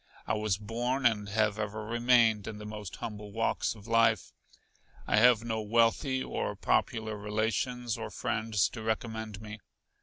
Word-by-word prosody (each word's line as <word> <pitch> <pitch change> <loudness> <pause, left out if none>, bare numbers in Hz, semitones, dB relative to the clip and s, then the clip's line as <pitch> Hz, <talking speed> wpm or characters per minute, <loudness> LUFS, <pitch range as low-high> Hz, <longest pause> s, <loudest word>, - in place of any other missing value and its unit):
I - - 0
was 105 -3 0
born, 120 +5 -2
and 105 -4 +2
have 105 0 +1
ever 105 0 -3
remained, 115 -2 +3
in 105 - -5
the 105 - -8
most 105 -3 -7
humble 105 -1 -7
walks 115 +1 0
of 105 -2 -14
life. 115 -2 +2 0.7
I - - +2
have 120 0 +6
no 110 -1 -2
wealthy 115 +5 +2
or - - -3
popular 110 -1 0
relations 110 +3 -1
or 110 - -4
friends 110 -3 0
to 115 - -8
recommend 110 -1 -3
me. 105 0 -8
110 Hz, 155 wpm, -30 LUFS, 105-115 Hz, 0.7 s, have